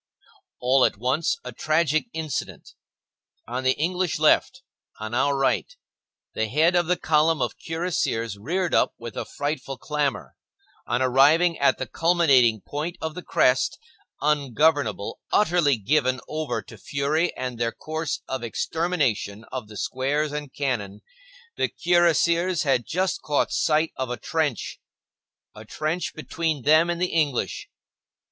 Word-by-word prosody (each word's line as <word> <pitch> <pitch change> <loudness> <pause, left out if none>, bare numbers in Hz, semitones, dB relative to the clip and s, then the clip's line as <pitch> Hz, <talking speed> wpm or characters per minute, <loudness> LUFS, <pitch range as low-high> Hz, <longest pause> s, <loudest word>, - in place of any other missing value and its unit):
All 130 +1 +3
at - - +2
once, 135 +6 0
a 125 - -6
tragic 155 - +1
incident; 160 -3 -5 0.7
on 125 +3 -3
the 130 0 +2
English 180 +2 0
left, 255 +12 +3 0.4
on 110 +1 -6
our 140 +3 +2
right, 135 - 0 0.6
the 110 - -1
head 160 +9 +3
of 175 -2 +2
the 180 0 +2
column 155 +1 +2
of - - -1
cuirassiers 160 - -2
reared 170 - -2
up - - +2
with 115 -1 -8
a - - -3
frightful 145 -2 -4
clamor. 150 0 -2 0.5
On 120 +2 +1
arriving 150 +7 +4
at 140 - +3
the - - -3
culminating 140 - +3
point 155 +4 -5
of 160 -1 -4
the 180 - -7
crest, 125 -6 +2 0.4
ungovernable, 145 -5 +1
utterly 170 - +3
given 130 +3 +1
over 155 -1 -3
to - - -13
fury 150 +5 0
and 125 -2 -4
their 115 -1 0
course 155 +1 -4
of 130 -1 -3
extermination 125 - -1
of 130 -5 -5
the 105 -1 -10
squares 145 +6 -1
and 150 -2 -5
cannon, 105 -8 -3 0.6
the - - +1
cuirassiers 175 0 +2
had 135 -5 +1
just 185 +2 -1
caught 145 -1 0
sight 155 +1 +1
of 130 -1 -2
a 125 - -3
trench,—a 145 -6 -6
trench 155 +9 -3
between 155 -2 -2
them 155 +4 +5
and 170 0 -1
the 180 0 -1
English. 150 -6 -1
150 Hz, 140 wpm, -24 LUFS, 130-165 Hz, 0.7 s, them